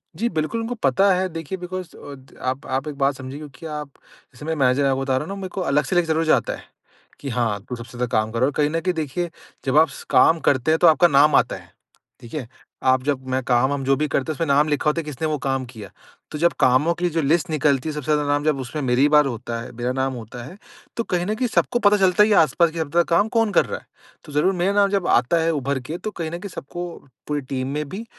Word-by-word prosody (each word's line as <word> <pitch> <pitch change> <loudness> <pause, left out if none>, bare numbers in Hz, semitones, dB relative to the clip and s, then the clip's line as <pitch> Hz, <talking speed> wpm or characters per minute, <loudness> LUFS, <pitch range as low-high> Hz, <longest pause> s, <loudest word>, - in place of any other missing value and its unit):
जी 235 +2 -1
बिल्कुल 160 +7 -2
उनको 230 +2 -3
पता 185 +9 +4
है 185 +1 0
देखिए 165 +2 -5
बिकॉज़ 180 -1 -7
अ 140 - -9 0.3
आप 130 +2 -4
आप 130 +3 -2
एक 150 - -5
बात 140 0 +1
समझिए 130 +1 -7
क्योंकि 150 0 -11
आप 150 -1 -6 0.4
जैसे 140 +4 -11
मैं 160 0 -1
मैनेजर 135 -1 +2
आपको 135 0 0
बता 135 -1 0
रहा 150 - -2
हूँ - - -10
ना 195 - -4
मेरे 190 - -5
को - - 0
अलग 150 +1 +3
से - - +1
लग 175 - +4
ज़रूर 160 0 0
जाता 155 - +2
है - - -13 0.6
कि 140 - -6
हाँ 115 -4 0
तू 125 - -4
सबसे 120 +1 -10
ज़्यादा 125 - 0
काम 110 0 0
करो 125 +4 +1
कहीं 150 0 +3
न 165 +1 -1
कहीं 180 +2 -1
देखिए 165 +2 -3 0.3
जब 135 +2 +3
आप 160 +1 +6
स 140 - -10
काम 165 0 +5
करते 130 +2 +2
हैं 160 - +3
तो 175 - +5
आपका 165 +2 +6
नाम 145 0 +5
आता - - +2
है। - - -15 0.5
ठीक 115 - -12
है? 135 -7 -4 0.3
आप 130 -1 +3
जब 135 -2 -2
मैं 130 0 0
काम 125 +2 +2
हम 140 -1 -2
जो 135 +1 +3
भी 150 +2 0
करते 140 +1 -1
हैं - - -6
उसमें 165 - 0
नाम 145 +2 +3
लिखा 150 0 0
होता 150 +2 +1
है - - -7
किसने 150 +1 -4
वो 155 -1 -1
काम 135 -1 0
किया। 110 -6 -11 0.4
तो 150 - -5
जब 170 +2 +3
कामों 130 +6 +4
की 175 +1 -1
जो 165 0 0
लिस्ट 160 +5 +1
निकलती 150 -1 +1
है - - -2
सबसे 150 0 -2
ज़्यादा 150 0 +2
नाम 145 0 +1
जब 155 -3 +1
उसमें 145 +4 -5
मेरी 130 +2 +3
बार 150 -1 +5
होता 115 -2 -4
है 115 - -8
मेरा 120 +1 -3
नाम 130 +1 -1
होता 120 +1 -8
है 170 +9 -11 0.4
तो 230 - 0
कहीं 180 -3 -1
न 210 - 0
कहीं 245 +3 -1
सबको 240 +2 +1
पता 205 -3 +4
चलता 190 0 +4
है 210 - +4
ये 215 - +3
आस-पास 165 +2 +4
के 165 - -7
सब 160 0 -3
काम 170 +6 +3
कौन 225 -2 +2
कर - - +4
रहा - - -4
है, - - -26 0.4
तो 150 - -12
ज़रूर 150 +6 +2
मेरा 180 +2 +1
नाम 200 0 +3
जब 195 -3 0
आता 125 +8 +3
है 165 - +2
उभर 140 -2 -1
के 155 +7 -6
तो 215 - -4
कहीं 165 -6 -5
न 170 - -5
कहीं 200 +3 -7
सबको 175 +3 -6 0.4
पूरी 150 -1 -1
टीम 130 -1 -4
में 150 -1 -3
भी 200 +9 -6
150 Hz, 275 wpm, -22 LUFS, 130-170 Hz, 0.6 s, आप